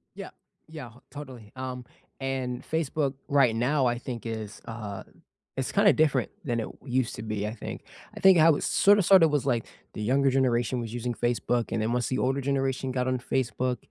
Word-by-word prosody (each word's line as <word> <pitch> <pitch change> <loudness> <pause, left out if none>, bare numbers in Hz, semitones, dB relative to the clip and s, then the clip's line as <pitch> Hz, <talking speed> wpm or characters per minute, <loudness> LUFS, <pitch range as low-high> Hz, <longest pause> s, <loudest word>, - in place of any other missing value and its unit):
Yeah, - - -7 0.4
yeah, 150 -7 -9 0.2
totally, 130 -7 -10
um, 130 -1 -6 0.3
and 130 -2 -3
Facebook 150 -3 -1
right 135 -5 +3
now 130 +4 +1
I 120 0 +1
think 120 -2 -7
is, 110 -2 -6
uh 110 -4 -6 0.5
it's 135 -1 -2
kinda 200 0 +5
different 155 -2 +1
than 120 -6 -1
it 110 - -3 0.2
used 130 -2 -1
to - - -7
be, 105 -1 -3
I 110 - -4
think 115 - -7 0.3
I - - -7
think 190 -2 +7
how 160 -1 +6
it - - -4
sorta 205 +1 +4
sorta 185 -2 +7
was 145 -3 0
like 120 -4 0 0.3
the - - -6
younger 135 +5 +2
generation 125 -2 +1
was 115 -1 -5
using 120 0 -3
Facebook 120 0 -1
and 110 - -1
then 110 - 0
once 125 -1 0
the 130 - -1
older 135 +2 0
generation 135 -1 -1
got 125 0 -1
on 130 -1 0
Facebook, 125 0 -1
130 Hz, 195 wpm, -27 LUFS, 120-140 Hz, 0.5 s, think